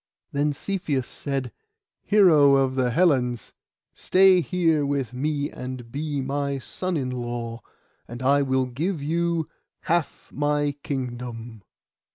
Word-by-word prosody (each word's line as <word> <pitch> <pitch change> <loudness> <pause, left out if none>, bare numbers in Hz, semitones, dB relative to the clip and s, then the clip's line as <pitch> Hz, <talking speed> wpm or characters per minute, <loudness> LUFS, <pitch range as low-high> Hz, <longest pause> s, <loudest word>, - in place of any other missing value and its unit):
Then 145 +1 +1
Cepheus 145 -5 -2
said, 135 -4 -4 0.5
'Hero 155 -9 +5
of 135 -1 +2
the 130 -1 +1
Hellens, 125 -5 +1 0.4
stay 185 -1 +4
here 165 -4 +1
with 140 -3 -2
me 145 +2 -2
and 125 -2 -7
be 145 0 -2
my 140 +1 -2
son 185 +6 -3
in 130 -3 -2
law, 120 -2 -4 0.5
and 120 +2 -7
I 140 +2 +4
will 130 -1 +1
give 150 +6 -3
you 170 +2 0
the - - -23 0.3
half 170 -3 -1
of - - -17
my 145 0 +1
kingdom. 120 -4 -5
140 Hz, 135 wpm, -24 LUFS, 125-155 Hz, 0.5 s, Hero